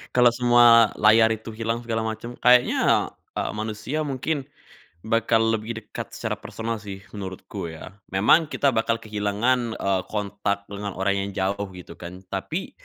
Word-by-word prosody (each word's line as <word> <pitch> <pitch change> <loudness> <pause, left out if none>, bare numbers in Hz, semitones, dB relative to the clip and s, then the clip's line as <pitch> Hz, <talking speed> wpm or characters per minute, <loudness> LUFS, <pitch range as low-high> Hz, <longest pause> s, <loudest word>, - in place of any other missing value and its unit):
kalo 125 -1 +6
semua 120 -2 +6
layar 110 +1 +6
itu 110 0 -5
hilang 115 +1 -2
segala 115 -1 -2
macem 110 +2 -5
kayaknya, 125 0 +4 0.2
eee, - - -2
manusia 110 +8 -3
mungkin 140 +1 -2 0.6
bakal 115 0 +2
lebih 110 +1 -2
dekat - - -8
secara - - -3
personal 115 0 -4
sih, 100 -2 -9
menurutku 95 -4 -6
ya. 80 +2 -9 0.2
Memang 110 - +4
kita 140 -1 +1
bakal 115 -1 0
kehilangan, 110 +3 0
eee, 95 -1 0
kontak 100 -1 -2
dengan 100 0 -5
orang 100 +1 0
yang - - -5
jauh 100 +1 -1
gitu 90 - -11
kan, 90 +2 -9
tapi - - -4
110 Hz, 150 wpm, -24 LUFS, 100-115 Hz, 0.6 s, kalo